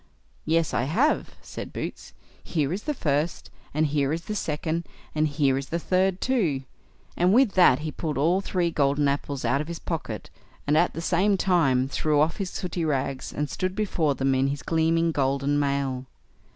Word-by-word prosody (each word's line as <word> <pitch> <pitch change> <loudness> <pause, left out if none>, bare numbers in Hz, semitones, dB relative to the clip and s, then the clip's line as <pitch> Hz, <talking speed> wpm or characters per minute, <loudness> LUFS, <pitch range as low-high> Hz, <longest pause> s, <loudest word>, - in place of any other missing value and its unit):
"Yes, 165 0 +1
I 120 - +1
have", 235 - +1
said - - -7
Boots; - - -6 0.3
"here 155 -2 -1
is 200 - -5
the 300 - 0
first, 150 - -1 0.2
and 155 +2 +1
here 145 -2 +1
is 165 +2 -2
the 215 - -4
second, 165 -2 -2 0.3
and 155 0 +2
here 140 -3 +1
is 135 - -7
the 170 - -1
third 185 +2 +1
too"; 180 - 0 0.5
and 180 +4 +3
with 255 -4 +5
that 180 -10 +6
he 155 - -2
pulled 150 -1 -3
all 170 +7 +2
three 180 -3 0
golden 145 -1 +2
apples 140 -1 -2
out 140 - +2
of 150 - -5
his 170 0 -5
pocket, 165 -2 -5 0.3
and 145 - +2
at 175 +3 +3
the 165 - -3
same 190 +4 +2
time 140 -10 +2
threw 150 +2 +1
off 155 +2 +2
his 195 -3 -3
sooty 180 -2 -3
rags, 135 -3 -1
and 150 +1 -2
stood 185 +6 -3
before 170 -9 0
them 135 +1 +1
in 130 +1 +2
his 140 0 -3
gleaming 165 0 +2
golden 140 0 +1
mail. 140 -2 -1
155 Hz, 190 wpm, -26 LUFS, 140-175 Hz, 0.5 s, that